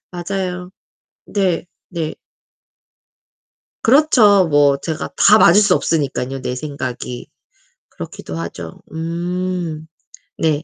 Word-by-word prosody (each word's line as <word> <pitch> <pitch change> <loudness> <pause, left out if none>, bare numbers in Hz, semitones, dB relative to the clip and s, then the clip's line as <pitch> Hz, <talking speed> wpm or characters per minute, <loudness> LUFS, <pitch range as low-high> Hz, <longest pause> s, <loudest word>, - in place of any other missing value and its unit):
맞아요. 180 0 -4 0.6
네. 185 -4 0 0.2
네. 165 -3 -3 1.7
그렇죠. 225 - +5
뭐 145 -1 +4
제가 155 +2 -4
다 210 +2 +6
맞을 195 0 +7
수 210 - +4
없으니깐요, 135 -4 -1
내 125 - -3
생각이. 130 -3 -6 0.6
그렇기도 80 - -8
하죠. 85 0 -7
음. 170 0 -3 0.5
네. 155 -1 0
165 Hz, 180 characters per minute, -18 LUFS, 145-185 Hz, 1.7 s, 맞을